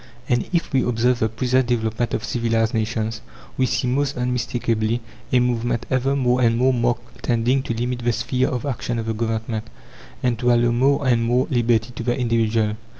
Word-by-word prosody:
And, 120 -1 0
if 170 -4 -1
we 135 - +4
observe 125 +1 +1
the 110 - +1
present 125 +3 +1
development 115 -1 0
of - - -3
civilized 115 -1 0
nations, 110 0 -2 0.3
we 130 - +1
see, - - 0
most 140 +2 0
unmistakably, 120 -2 -1 0.3
a 125 - +4
movement 120 -1 0
ever 130 +2 +1
more 125 -2 +2
and 115 -1 +3
more 130 +2 +3
marked 120 -1 -2
tending 120 +3 +1
to 120 - -3
limit 120 +1 -2
the 120 0 +1
sphere 120 +3 0
of 125 +2 -3
action 120 -3 -2
of 115 - -3
the 110 - -1
Government, 110 0 -2 0.6
and 125 -2 +1
to 125 0 +3
allow 120 0 +3
more 135 +3 +2
and 120 -2 +3
more 125 +2 +2
liberty 120 -1 +2
to 120 - -7
the 120 +2 0
individual. 115 -3 +1
120 Hz, 190 wpm, -22 LUFS, 115-125 Hz, 0.6 s, we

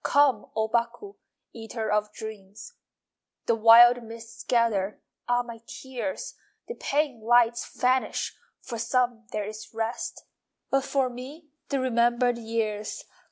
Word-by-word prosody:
Come, 280 -6 +3
O 220 0 +1
Baku, 240 - -2 0.4
Eater 225 -1 -4
of 210 0 +1
dreams! 215 - -9 0.7
The 235 - +3
wild 235 +2 +8
mists 230 0 -10
gather 215 -5 +1 0.3
(Ah, 245 0 +3
my 235 -2 -10
tears!) 265 +1 -5 0.3
The 470 - -4
pane 285 - -1
lights 235 +1 +2
vanish 255 +1 +1 0.3
(For 235 -3 -6
some 235 -1 0
there 210 -1 -2
is 215 +1 -9
rest.) 225 +1 -4 0.5
But 270 0 +2
for 270 -2 +1
me 270 +6 -9 0.2
The 275 - 0
remembered 240 -1 +2
years! 220 -2 -3
235 Hz, 125 wpm, -27 LUFS, 220-250 Hz, 0.7 s, wild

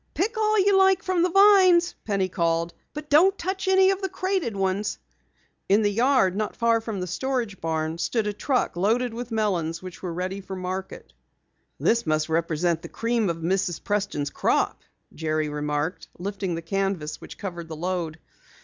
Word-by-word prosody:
"Pick 420 +8 0
all 430 0 +2
you 400 0 +4
like 385 -1 +4
from 370 -2 +1
the 360 - +3
vines," 375 -2 +6
Penny 195 -3 0
called, 170 -1 0 0.2
"but 300 0 -7
don't 360 +7 +5
touch 380 +2 -3
any 380 0 +5
of 390 0 -2
the 385 - -2
crated 370 - -1
ones." 195 +1 -1 0.7
In 205 +3 +4
the 205 - +2
yard 230 -4 +3
not 215 0 -2
far 230 -1 +2
from 220 -3 -4
the 180 - -2
storage 230 +1 -3
barn 160 0 -2
stood 225 +4 0
a 210 - -1
truck 250 +2 0
loaded 225 +6 +1
with 240 +1 -6
melons 180 -7 -1
which 185 0 -9
were 180 - -4
ready 185 +3 -4
for 190 0 -7
the 185 - -7
market. 185 +1 -6 0.7
"This 230 -5 +1
must 155 0 +1
represent 165 +1 0
the - - -9
cream 230 -3 0
of 170 - -2
Mrs. 175 0 -1
Preston's 200 -9 -1
crop," - - 0 0.3
Jerry 155 -1 -1
remarked, 150 +3 -3
lifting 195 -1 -3
the 165 - -5
canvas 195 -4 -2
which - - -10
covered 175 -5 -6
the 160 - -7
load. 170 -1 -3
195 Hz, 180 wpm, -25 LUFS, 170-265 Hz, 0.7 s, vines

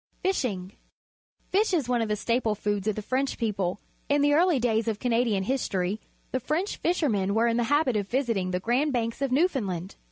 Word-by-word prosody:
Fishing. 225 - -1 0.4
— - - -44
Fish 395 0 +3
is 295 -8 0
one 245 -1 +1
of 225 - 0
the 210 - +1
staple 230 0 0
foods 205 -1 -2
of 215 - +1
the 215 - -5
French 265 +4 -1
people. 200 -5 -1 0.3
Tn 285 0 +3
the 290 0 +4
early 335 -1 +4
daj^s 230 -1 +1
of 220 -2 0
Canadian 230 -4 +1
history, 200 -4 -1 0.3
the 260 - 0
French 315 - -2
fishermen 220 - +1
were 225 +1 +3
in 230 0 +2
the 240 - +1
habit 290 -2 +2
of 205 -2 -1
visiting 230 -8 0
the 180 0 -1
Grand 255 +8 +1
Banks 230 +1 -2
of 275 -2 0
Newfoundland. 225 - 0
235 Hz, 200 wpm, -27 LUFS, 205-275 Hz, 0.4 s, the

